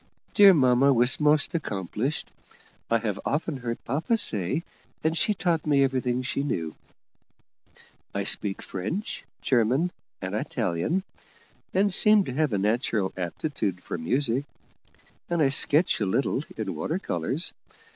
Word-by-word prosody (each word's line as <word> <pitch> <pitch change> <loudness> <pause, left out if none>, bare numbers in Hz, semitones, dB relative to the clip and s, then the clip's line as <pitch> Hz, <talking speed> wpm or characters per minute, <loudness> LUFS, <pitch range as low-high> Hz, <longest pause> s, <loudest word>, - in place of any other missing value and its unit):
Dear 200 -3 +7
mamma 130 -1 +4
was 125 0 +4
most 150 0 +3
accomplished, 115 - -3 0.6
I 115 - +3
have 110 -3 -3
often 150 0 -2
heard 120 -2 -5
papa 160 - 0
say, 115 - +1 0.4
and 160 +1 +1
she 210 +5 +1
taught 170 -4 -1
me 140 -2 +4
everything 130 -2 -1
she 140 +2 -2
knew. 80 - -3 1.4
I - - -2
speak 100 -2 +1
French, 110 - -5 0.2
German, 130 +8 +2 0.3
and - - -5
Italian, 120 - -1 0.7
and 195 +1 +1
seem 210 +1 +6
to 130 - -5
have 150 0 0
a 105 - 0
natural 105 -1 0
aptitude 95 - -3
for - - -5
music; 130 - +1 0.8
and 170 -1 0
I 145 -3 +4
sketch 145 +1 +3
a 100 - +1
little 95 - 0
in - - -3
water - - -3
colours. - - -2
135 Hz, 135 wpm, -26 LUFS, 110-160 Hz, 1.4 s, Dear